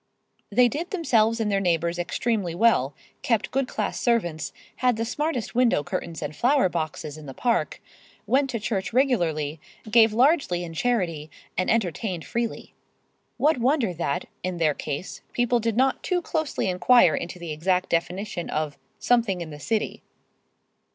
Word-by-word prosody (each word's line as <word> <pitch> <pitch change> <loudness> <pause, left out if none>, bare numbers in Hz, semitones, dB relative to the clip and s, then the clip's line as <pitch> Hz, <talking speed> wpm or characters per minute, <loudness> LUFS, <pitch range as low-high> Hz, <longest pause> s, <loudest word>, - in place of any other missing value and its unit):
They 245 +4 +5
did 310 +8 -4
themselves 230 - +2
and 215 -2 0
their 200 - +2
neighbors 170 -2 0
extremely 180 0 -1
well, 170 - +3 0.3
kept 230 -4 0
good 270 -1 0
class - - -3
servants, 175 -10 0 0.3
had 250 -2 +2
the 230 - -1
smartest 295 -1 -2
window 240 -11 +3
curtains 170 -1 -4
and 150 +1 -5
flower 260 -4 +3
boxes 155 -2 -4
in 150 - -11
the 135 - -8
Park, 240 -2 0 0.5
went 270 +1 +2
to 235 -2 -2
church 200 -2 -2
regularly, 165 - +1 0.3
gave 225 -1 +6
largely 245 - +2
in 165 -1 -7
charity 170 -8 -1 0.3
and 185 - 0
entertained 190 -4 -1
freely. 235 -1 -3 0.6
What 300 -3 +3
wonder 250 - +2
that, 155 -4 -2 0.2
in 180 -1 -3
their 160 -3 +2
case, 145 +5 -5
people 245 0 +2
did 230 -1 -1
not 265 +1 +2
too 360 -2 -1
closely 315 -9 -1
inquire 180 0 +5
into 175 +4 -4
the 170 -2 -6
exact 180 +4 0
definition 180 +2 -2
of 150 -2 -2 0.2
"something 230 -7 +2
in 165 -2 -6
the 150 - -9
city." 220 +6 -2
205 Hz, 160 wpm, -25 LUFS, 170-245 Hz, 0.6 s, gave